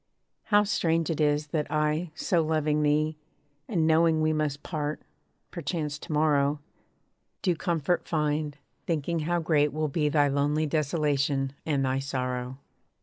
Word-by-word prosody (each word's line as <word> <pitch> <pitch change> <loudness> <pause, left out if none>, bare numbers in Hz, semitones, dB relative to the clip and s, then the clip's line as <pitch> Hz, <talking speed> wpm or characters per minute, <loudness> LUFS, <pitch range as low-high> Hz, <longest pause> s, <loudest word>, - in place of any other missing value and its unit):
How 210 -1 +4
strange 165 -5 +1
it 155 - -2
is, 150 0 +1
that 150 0 -2
I, 155 +3 0
so 175 -3 +1
loving 155 -1 +1
thee, 150 +1 +1 0.5
And 170 -7 +1
knowing 160 0 +4
we 155 0 +2
must 150 -2 -2
part, 150 -2 -3 0.5
perchance 150 -3 -3
to - - -9
morrow, 150 -1 +2 0.8
Do 180 -4 +2
comfort 170 +1 -1
find, 150 -2 -1 0.3
thinking 165 0 -1
how 170 +3 0
great 150 -2 +2
will 155 0 -1
be 150 +1 +1
Thy 145 -1 +3
lonely 145 +2 +1
desolation, 145 -3 0
and 140 -3 +1
thy 130 +1 0
sorrow. 130 -2 -3
150 Hz, 145 wpm, -27 LUFS, 145-160 Hz, 0.8 s, How